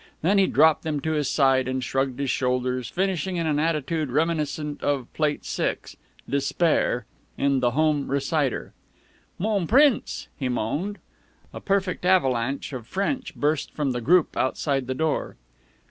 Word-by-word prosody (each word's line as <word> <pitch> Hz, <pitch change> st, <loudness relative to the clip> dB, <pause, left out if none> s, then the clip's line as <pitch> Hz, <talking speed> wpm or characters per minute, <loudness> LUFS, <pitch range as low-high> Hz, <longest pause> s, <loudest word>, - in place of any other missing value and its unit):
Then 195 Hz, +5 st, +4 dB
he 190 Hz, -, +4 dB
dropped 155 Hz, +2 st, +4 dB
them 155 Hz, -3 st, -2 dB
to 160 Hz, -, -1 dB
his 150 Hz, -3 st, 0 dB
side, 135 Hz, -3 st, +3 dB
and 130 Hz, 0 st, -2 dB
shrugged 135 Hz, 0 st, -1 dB
his 140 Hz, -2 st, 0 dB
shoulders, 125 Hz, -1 st, -1 dB
finishing 190 Hz, 0 st, -1 dB
in 170 Hz, -1 st, -1 dB
an 150 Hz, -2 st, +1 dB
attitude 155 Hz, -1 st, -1 dB
reminiscent 150 Hz, 0 st, -1 dB
of 140 Hz, -4 st, -1 dB
Plate 150 Hz, -2 st, -1 dB
6 -, -, -3 dB, 0.3 s
("Despair") 140 Hz, -3 st, +1 dB, 0.3 s
in 140 Hz, -1 st, +2 dB
"The 125 Hz, -1 st, +2 dB
Home 155 Hz, -2 st, +2 dB
Reciter." 140 Hz, 0 st, -1 dB, 0.6 s
"Mon 200 Hz, -3 st, 0 dB
Prince!" 275 Hz, +1 st, +3 dB
he 130 Hz, -3 st, -3 dB
moaned. 145 Hz, -, -2 dB, 0.6 s
A -, -, -7 dB
perfect 195 Hz, -3 st, 0 dB
avalanche 135 Hz, -8 st, +1 dB
of 120 Hz, -3 st, -6 dB
French 260 Hz, +8 st, -2 dB
burst 150 Hz, 0 st, 0 dB
from 145 Hz, -3 st, 0 dB
the 120 Hz, -1 st, -3 dB
group 170 Hz, +7 st, +3 dB
outside 135 Hz, 0 st, 0 dB
the 130 Hz, -, -2 dB
door. 155 Hz, +1 st, -1 dB
150 Hz, 150 wpm, -25 LUFS, 130-170 Hz, 0.6 s, Then